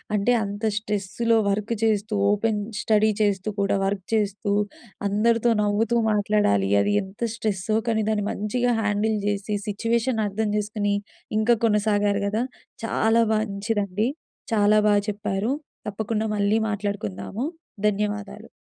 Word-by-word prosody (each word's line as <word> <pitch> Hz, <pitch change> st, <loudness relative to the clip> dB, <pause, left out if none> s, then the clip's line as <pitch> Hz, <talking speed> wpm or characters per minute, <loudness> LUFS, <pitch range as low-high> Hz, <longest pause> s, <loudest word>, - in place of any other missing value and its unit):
అంటే, 210 Hz, +4 st, +2 dB
అంత 205 Hz, +2 st, -6 dB
స్ట్రెస్సులో 215 Hz, +2 st, 0 dB
వర్కు 210 Hz, +3 st, -1 dB
చేస్తూ, 215 Hz, 0 st, +1 dB, 0.2 s
ఓపెన్ 210 Hz, 0 st, +1 dB, 0.2 s
స్టడీ 215 Hz, 0 st, +3 dB
చేస్తూ 205 Hz, 0 st, +1 dB
కూడా, 200 Hz, 0 st, +2 dB
వర్క్ 195 Hz, -1 st, -2 dB
చేస్తూ, 205 Hz, -1 st, 0 dB, 0.6 s
అందరితో 230 Hz, +3 st, +2 dB
నవ్వుతూ 210 Hz, +3 st, +1 dB, 0.2 s
మాట్లాడాలి. 205 Hz, -, +2 dB
అది 205 Hz, -, +1 dB
ఎంత 190 Hz, +4 st, -14 dB
స్ట్రెస్సో, 215 Hz, -1 st, -1 dB
కానీ 220 Hz, -1 st, +1 dB
దాన్ని 210 Hz, -2 st, 0 dB
మంచిగా 240 Hz, +4 st, 0 dB
హ్యాండిల్ 210 Hz, +1 st, +1 dB
జేసి, 205 Hz, 0 st, -1 dB
సిచ్యువేషన్ 230 Hz, +2 st, 0 dB
అర్థం 210 Hz, +1 st, -1 dB
చేసుకొని, 205 Hz, -1 st, -1 dB, 0.5 s
ఇంకా 235 Hz, +2 st, +4 dB
కొనసాగారు 205 Hz, -1 st, +2 dB
గదా! 215 Hz, +4 st, 0 dB, 0.4 s
చాలా 225 Hz, +1 st, +3 dB
మంచిదండి. 205 Hz, 0 st, -1 dB, 0.5 s
చాలా 210 Hz, 0 st, +4 dB
బా -, -, +5 dB, 0.2 s
చెప్పారు. 205 Hz, +2 st, -2 dB, 0.4 s
తప్పకుండా 215 Hz, +1 st, -2 dB
మళ్ళీ 205 Hz, +2 st, +2 dB
మాట్లాడుకుందాము. 200 Hz, -, -3 dB, 0.4 s
ధన్యవాదాలు. 210 Hz, +1 st, -2 dB
210 Hz, 120 wpm, -24 LUFS, 200-220 Hz, 0.6 s, బా